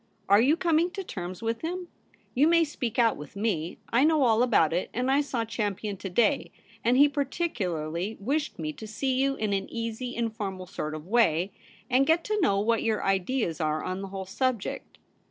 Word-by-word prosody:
Are 200 +2 +6
you 290 +7 +4
coming 340 -1 +2
to 390 - -4
terms 180 - -6
with 230 0 -1
him? 355 +2 -4 0.5
You 280 +5 +4
may 335 0 +5
speak 255 -7 -4
out 230 -2 +3
with 150 +3 -10
me. 200 -6 -1 0.2
I 240 +3 +5
know 310 -2 +4
all 230 -2 +4
about 210 -11 +3
it; 180 - -1
and 250 +2 +1
I 280 +2 +4
saw 250 -5 -2
Champion 210 -2 -3
to 190 - -6
day, 235 +9 +2 0.3
and 245 +2 +3
he 285 +2 +8
particularly 210 - -2
wished 290 +9 -1
me 155 -2 -3
to 220 - -9
see 260 +5 -1
you 275 0 +1
in 215 -5 -1
an 195 - -2
easy 230 +2 -4
informal 215 -5 -3
sort 155 -4 -4
of 155 0 -8
way, 190 -4 +2 0.4
and 265 +2 +3
get 325 +1 +3
to 425 -1 -1
know 200 - +3
what 225 +2 +2
your 220 -2 0
ideas 195 - 0
are 155 0 0
on 185 +1 -3
the 195 - -5
whole 190 0 -6
subject. 235 +2 -2
225 Hz, 200 wpm, -27 LUFS, 190-275 Hz, 0.5 s, he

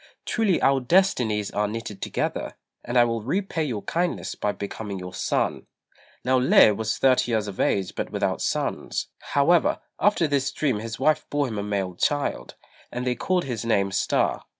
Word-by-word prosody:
Truly 215 -6 +1
our 135 0 +4
destinies 125 - +2
are 105 +1 0
knitted 105 -2 -6
together, - - -3 0.3
and 120 +1 -1
I 120 - +7
will 115 -1 -1
repay 170 - -1
your 115 -8 -3
kindness 175 +1 -1
by 105 - -1
becoming 100 0 -6
your 90 -1 -7
son." - - -1 0.6
Now 130 0 +3
Lê 115 -4 +6
was 110 +1 -2
thirty 130 -2 +3
years 110 -2 0
of 100 - -7
age 95 -2 +1
but - - -4
without - - -1
sons; - - -2
however, 155 +4 +2 0.2
after 205 -4 +3
this 140 -2 0
dream 135 -8 0
his 115 +1 -6
wife 155 0 +2
bore 145 -1 0
him 110 -4 -4
a - - -2
male 100 -3 -2
child, 145 +10 -1 0.4
and 125 +1 -4
they 125 - +1
called 180 +7 0
his 120 -5 -4
name 100 -4 +1
Star. - - 0
120 Hz, 175 wpm, -25 LUFS, 105-145 Hz, 0.6 s, I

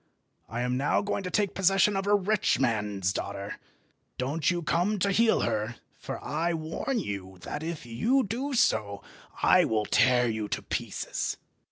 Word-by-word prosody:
I 115 +2 -3
am 125 0 0
now 140 +8 +1
going 205 0 -1
to 185 - -4
take 205 0 +1
possession 195 +1 +3
of 195 +1 -1
a 205 - +5
rich 205 - +1
man's 105 -6 0
daughter. 100 0 -5 0.6
Don't 145 +5 0
you 175 -1 -1
come 180 +7 +1
to 200 +1 +1
heal 225 +3 +3
her, 110 +1 -1 0.2
for - - -6
I 165 +3 -1
warn 160 +11 -3
you 95 - -5
that 150 - -5
if 160 -4 -5
you 230 - +1
do 260 +7 -3
so 100 - +1 0.4
I - - +6
will 110 -1 0
tear 125 +1 +4
you 110 -2 -2
to - - -3
pieces." - - -3
155 Hz, 170 wpm, -28 LUFS, -, 0.6 s, I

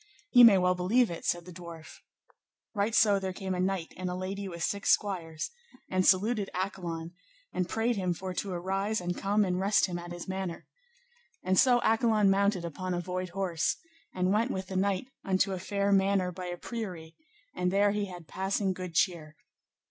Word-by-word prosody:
Ye 245 -2 +8
may 220 -5 +9
well 180 0 +3
believe 195 +6 +2
it, 170 - -7
said 175 -1 0
the 180 - -10
dwarf. 170 -2 -10 0.7
Right 210 +1 0
so 205 -2 +5
there 190 -1 -3
came 190 0 -4
a 180 - -2
knight 185 -2 -1
and 185 0 -4
a 180 - -3
lady 195 +2 -4
with 170 -3 -5
six 200 +3 -1
squires, 170 - 0 0.4
and 185 0 +2
saluted 205 +2 +3
Accolon, 175 -3 -4 0.4
and 180 -1 -1
prayed 225 +1 0
him 180 -2 0
for 185 +1 -5
to 195 +2 -3
arise, 195 +4 -1
and 175 0 -3
come 205 +1 +1
and 180 -1 -1
rest 200 +2 +3
him 175 -2 -4
at 175 0 -8
his 175 -1 -7
manor. 190 -2 -4 0.8
And 185 +1 +2
so 245 +4 +5
Accolon 220 -3 +3
mounted 195 -2 +2
upon 180 +3 -3
a - - -1
void 180 +1 -4
horse, 175 -3 -1 0.3
and 185 +1 0
went 225 +4 +2
with 190 -6 -4
the 190 - -5
knight 195 +2 +1 0.2
unto 190 0 +1
a 185 - -3
fair 200 +2 -1
manor 195 -1 +3
by 180 +1 -7
a 175 0 -4
priory, 180 -8 -6 0.4
and 180 - 0
there 200 +2 +3
he 205 0 -1
had 175 -4 -10
passing 190 +3 -1
good 180 -2 -7
cheer. 155 -1 0
185 Hz, 195 wpm, -29 LUFS, 180-200 Hz, 0.8 s, may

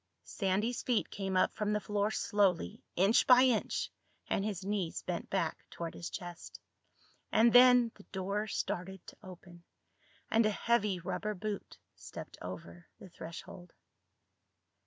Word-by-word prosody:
Sandy's 205 +4 -1
feet 240 -4 0
came 190 -2 -2
up 185 - +3
from 210 -1 -1
the 210 - +1
floor 205 0 0
slowly, 200 - +1
inch 195 +5 +4
by 250 0 +8
inch, 250 -4 +1 0.4
and 195 - 0
his 200 -3 -3
knees 195 -5 -2
bent - - -4
back - - -1
toward 170 -1 -6
his 170 - -6
chest. 175 -3 -8 0.7
And 225 +1 +5
then 245 -1 +7
the 200 - -17
door 200 +2 -3
started 190 -1 -4
to - - -12
open, 180 -3 -13 0.7
and 225 +1 +5
a - - +3
heavy 210 -3 +1
rubber 210 +4 -3
boot 205 +1 -5 0.2
stepped - - -10
over 90 -1 -8
the 190 - -12
threshold. 170 +1 -10
200 Hz, 140 wpm, -33 LUFS, 180-215 Hz, 0.7 s, by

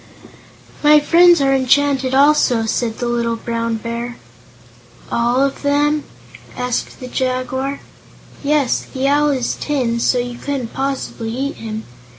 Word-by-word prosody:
"My 300 0 +6
friends 345 +2 +5
are 270 0 +3
enchanted, 265 0 +2
also," 275 -5 +4
said 225 0 -1
the 245 - -3
little 235 -1 0
Brown 230 0 -2
Bear. 235 +2 -5 0.9
"All 240 +3 +2
of 275 0 -2
them?" 290 +1 +1 0.5
asked 250 -1 -3
the 255 - -7
Jaguar. 260 +2 -2 0.6
"Yes. 285 -3 +1
The 265 0 -1
Owl 295 +1 +3
is 260 -4 -1
tin, 250 -6 -1
so 250 - +2
you 245 0 -3
couldn't 270 -5 -4
possibly 270 -4 -3
eat 270 +5 -3
him. 220 -1 -6
260 Hz, 135 wpm, -18 LUFS, 235-285 Hz, 0.9 s, My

